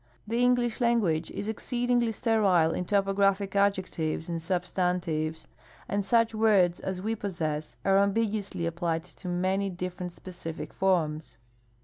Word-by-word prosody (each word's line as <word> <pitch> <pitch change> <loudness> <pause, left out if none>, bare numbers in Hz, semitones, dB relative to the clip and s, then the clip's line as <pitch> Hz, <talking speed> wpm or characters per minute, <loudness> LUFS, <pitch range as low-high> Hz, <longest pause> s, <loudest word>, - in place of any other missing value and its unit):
The 230 +3 -1
English 245 -1 +2
language 205 -10 +2
is 205 - -5
exceedingly 240 +1 0
sterile 200 -8 +3
in 180 - -2
topographic 195 0 +1
adjectives 185 -5 0
and 165 -1 -2
substantives, 175 -3 -1 0.4
and 200 0 0
such 230 +2 +3
words 205 -5 +3
as 185 -1 -4
we 220 +2 0
possess 155 - -3
are 195 0 +5
ambiguously 200 -3 0
applied 165 -1 -1
to 180 +2 -10
many 185 +3 0
different 180 0 -5
specific 170 -2 -8
forms. 155 -9 0
190 Hz, 125 wpm, -28 LUFS, 170-210 Hz, 0.4 s, are